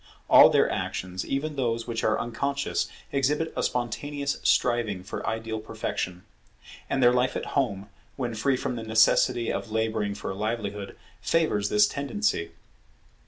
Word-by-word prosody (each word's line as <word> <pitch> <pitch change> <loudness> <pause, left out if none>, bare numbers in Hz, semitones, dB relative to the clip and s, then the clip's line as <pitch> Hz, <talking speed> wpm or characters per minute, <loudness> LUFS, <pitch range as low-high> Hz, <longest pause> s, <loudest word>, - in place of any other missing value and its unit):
All - - +10
their - - +4
actions, 90 0 -3
even 150 +2 -2
those 115 -4 -1
which 115 -1 -3
are 110 - +2
unconscious, 140 +4 -1 0.2
exhibit 150 +4 0
a - - -1
spontaneous 140 +4 -2
striving 115 -6 +1
for - - -6
ideal 110 0 -2
perfection. 90 -4 -4 0.7
And 135 - +1
their 120 0 +6
life 125 +1 +1
at - - -3
home, 105 -8 0 0.3
when 120 -3 -3
free 130 +4 +1
from 125 - -3
the 115 - -5
necessity 110 +1 +3
of 110 - -4
labouring 110 -2 -1
for 105 - -5
a - - -5
livelihood, 105 -1 -4 0.2
favours 115 -8 +1
this 105 0 +5
tendency. 140 - -1
115 Hz, 150 wpm, -26 LUFS, 105-135 Hz, 0.7 s, All